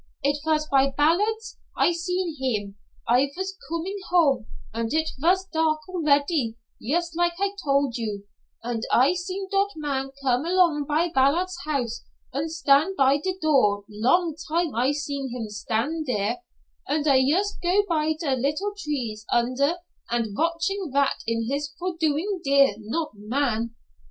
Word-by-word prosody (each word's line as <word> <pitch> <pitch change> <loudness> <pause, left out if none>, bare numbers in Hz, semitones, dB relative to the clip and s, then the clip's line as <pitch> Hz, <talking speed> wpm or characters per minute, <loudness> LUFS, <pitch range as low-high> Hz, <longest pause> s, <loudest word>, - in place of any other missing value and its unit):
"It 285 +1 +1
vas 310 -1 +1
by 275 -1 +4
Ballards' 420 +9 +1 0.2
I - - +4
seen 360 0 -2
heem. 210 -7 -2 0.3
I 250 +4 +4
vas 380 +1 -3 0.2
comin' 335 +5 -3
home 280 -10 +3 0.3
und 230 +4 -2
it 315 0 +1
vas 375 +5 +2
dark 315 0 +1
already 290 -8 +1 0.2
yust 335 +6 -1
like 345 0 +1
I 400 0 +1
tol' 280 -2 +2
you, 215 -4 -4 0.4
und 235 -1 -2
I 260 +7 +5
seen 370 +2 -4
dot 395 0 +2
man 275 -3 -2
come 250 0 +2
along 340 -5 +3
by 320 +4 +1
Ballards' 340 +7 +2
house 250 -6 -2 0.3
und 290 +4 -2
stand 320 +3 +3
by 270 +1 +5
der 370 +5 -2
door 210 -10 +3
long 275 - +2
time 330 0 0
I 245 +5 +2
seen 280 -2 -3
heem 235 -3 -5
stan' 225 +9 -2
dere, 230 - -1 0.5
und 295 +1 +1
I 275 -3 +5
yust 355 +11 +1
go 365 +4 +3
by 315 -2 +1
der 280 -5 0
little 300 +11 -1
trees 255 - -4
under, 255 +6 +2 0.4
und 230 -4 -1
vatching 335 - -1
vat 280 0 +2
it 230 +3 0
is 285 0 -4
for 360 +1 -2
doin' 330 +5 0
dere, 275 -5 +4 0.2
dot 325 +1 -1
man? 230 +1 -1
290 Hz, 155 wpm, -25 LUFS, 255-340 Hz, 0.5 s, I